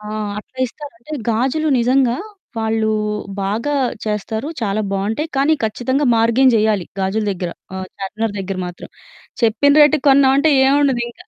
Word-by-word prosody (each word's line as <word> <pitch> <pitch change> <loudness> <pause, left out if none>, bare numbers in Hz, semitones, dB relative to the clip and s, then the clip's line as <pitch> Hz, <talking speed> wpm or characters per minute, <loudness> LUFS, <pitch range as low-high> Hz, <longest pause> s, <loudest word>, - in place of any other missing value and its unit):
ఆ! 210 - -11 0.3
అట్లా 255 +4 -13
ఇస్తారు. 290 +4 -10
అంటే 305 +6 -12 0.2
గాజులు 265 +8 0
నిజంగా 250 0 +2 0.4
వాళ్ళు 220 0 0 0.5
బాగా 225 +9 -1 0.3
చేస్తారు. 220 +5 -3
చాలా 210 -1 -1
బావుంటాయి. 220 +11 -2
కానీ 280 +3 +3
ఖచ్చితంగా 260 +6 -1
బార్గెయిన్ 235 +3 +4
జేయాలి 210 -4 +2 0.2
గాజుల 195 +3 -1
దగ్గర. 180 -2 -4 0.2
ఆహ్, 190 0 -5
చార్మినార్ 210 +2 -3
దగ్గర 195 0 -4
మాత్రం. 175 0 -9 0.5
చెప్పిన 235 +5 +3
రేటుకి 300 -1 +4
కొన్నామంటే 275 +2 +4
ఏముండదు 270 -3 +2
ఇంకా. 360 +9 -16
230 Hz, 140 wpm, -18 LUFS, 210-275 Hz, 0.5 s, బార్గెయిన్